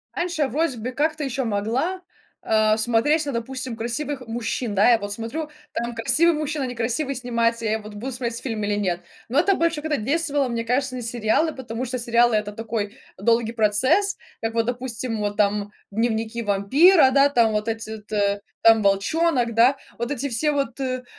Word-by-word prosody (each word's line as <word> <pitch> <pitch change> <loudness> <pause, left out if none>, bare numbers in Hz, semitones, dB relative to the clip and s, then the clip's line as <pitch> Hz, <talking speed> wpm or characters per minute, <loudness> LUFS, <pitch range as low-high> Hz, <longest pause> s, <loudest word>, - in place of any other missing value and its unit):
Раньше 345 -2 -2
я - - +1
вроде 290 0 -1
бы 235 +3 -4
как-то 310 +3 -1
еще 265 0 -2
могла, 235 - -1 0.4
а, 215 0 +3
смотреть 240 +8 +2
на, 280 - -2
допустим, 255 +1 -4
красивых 260 +5 -3
мужчин. 230 -1 -3
Да, 205 +5 +5
я 230 - +4
вот 205 0 -5
смотрю: 235 +9 -4 0.2
там 235 0 -3
красивый 335 +9 +3
мужчина, 300 -1 -2
некрасивый 250 +3 -2
снимается, 235 -2 0
я 220 +1 0
вот 210 0 -10
буду 250 +6 -5
смотреть 235 -1 -3
фильм 225 -5 -3
или 205 0 0
нет. 180 -4 -1 0.3
Но 270 - +3
это 390 +4 +3
больше 335 -3 0
когда 310 -1 -1
действовало, 285 +3 0
мне 235 -1 -2
кажется, 255 +2 0
на 250 - -4
сериалы, 235 +7 0
потому 245 -1 -5
что 255 +1 -3
сериалы- 235 0 +3
это 210 -1 -1
такой 220 0 -4 0.2
долгий 230 +3 +2
процесс, 260 - +2 0.2
как 225 0 -2
вот, 230 -1 +1
допустим, 245 -2 -3
вот 205 0 -2
там 205 0 +1 0.2
"Дневники 225 +1 -1
вампира", 260 - +5
да, 275 +1 +5
там 235 -5 +3
вот 210 +1 -1
эти 225 -1 -3
вот, 210 0 -18
э, 200 -1 +1 0.2
там 225 -1 +6
"Волчонок", 240 +6 +2
да, 245 +4 +5 0.2
вот 235 +3 -3
эти 280 0 -2
все 300 +6 +1
вот, 275 -2 -2
э, 255 -1 -2
235 Hz, 185 wpm, -23 LUFS, 220-275 Hz, 0.4 s, там